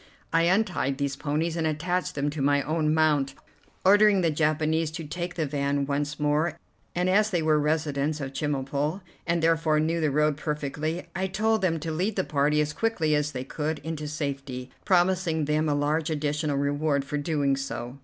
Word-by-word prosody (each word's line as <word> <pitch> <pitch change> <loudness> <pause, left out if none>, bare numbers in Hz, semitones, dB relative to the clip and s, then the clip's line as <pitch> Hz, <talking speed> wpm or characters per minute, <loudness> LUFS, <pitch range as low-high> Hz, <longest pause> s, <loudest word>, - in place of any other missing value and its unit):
I 165 0 +4
untied 180 -7 +1
these 140 -1 -1
ponies, 155 +3 -1
and 165 -2 0
attached 175 +4 -1
them 145 +1 0
to 150 -1 -4
my 145 0 +3
own 155 -1 0
mount, 150 -4 +2 0.5
ordering 205 0 +6
the 165 -2 +2
Japanese 155 +1 +1
to 165 0 -5
take 175 +3 -5
the 160 - 0
van 140 0 0
once 145 +1 -2
more; 150 +3 +1 0.4
and, 180 +1 +1
as 210 +3 +3
they 175 -5 0
were 155 -1 +3
residents 150 -1 0
of 135 -2 -5
Chemulpo, 145 +4 -1 0.3
and 170 -1 +1
therefore 160 -1 +3
knew 165 +2 0
the 155 - +2
road 150 +1 +2
perfectly, 150 +3 -3
I 190 +1 0
told 220 +3 +1
them 165 -4 +1
to 165 +1 -3
lead 185 +7 -1
the 190 - +1
party 150 0 +2
as 150 0 -1
quickly 165 -7 0
as 150 0 +1
they 125 -2 -4
could 150 +3 -3
into 155 -1 -4
safety, 140 -4 -4
promising 175 -4 +2
them 150 +1 +1
a 145 - +2
large 150 +3 0
additional 150 -1 -1
reward 140 0 0
for 150 +1 -2
doing 145 -2 +1
so. 135 -1 -5
155 Hz, 185 wpm, -26 LUFS, 145-165 Hz, 0.5 s, ordering